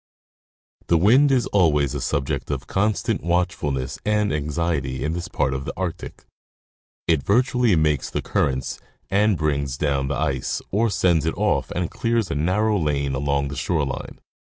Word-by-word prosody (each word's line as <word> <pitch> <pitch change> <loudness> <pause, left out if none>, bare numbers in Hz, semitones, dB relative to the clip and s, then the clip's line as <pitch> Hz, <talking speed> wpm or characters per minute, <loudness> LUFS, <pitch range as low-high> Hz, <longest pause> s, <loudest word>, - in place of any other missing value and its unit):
The 85 - +4
wind 125 - +5
is 125 -3 +3
always 75 -8 +2
a - - -3
subject 70 -2 -2
of 70 -3 -3
constant 105 +2 0
watchfulness 85 -7 -1
and 105 -3 +1
anxiety 75 -3 -2
in 80 - -1
this 85 0 -4
part 65 - 0
of 65 0 -3
the - - -5
Arctic; 90 -1 -5 0.8
it 80 -4 +3
virtually 120 - +2
makes 75 -3 +1
the - - -3
currents 65 -1 -1 0.3
and 105 0 +3
brings 70 -4 -1
down 70 -2 0
the 70 - -1
ice, 70 -3 -1
or 110 +4 +2
sends 85 -6 +2
it - - -2
off - - +1
and 90 -1 -2
clears 115 -5 0
a - - -1
narrow 100 +7 +1
lane 70 -3 0
along 70 +1 0
the 70 - -6
shore 75 +1 0
line. 70 - -6
80 Hz, 165 wpm, -23 LUFS, 70-100 Hz, 0.8 s, wind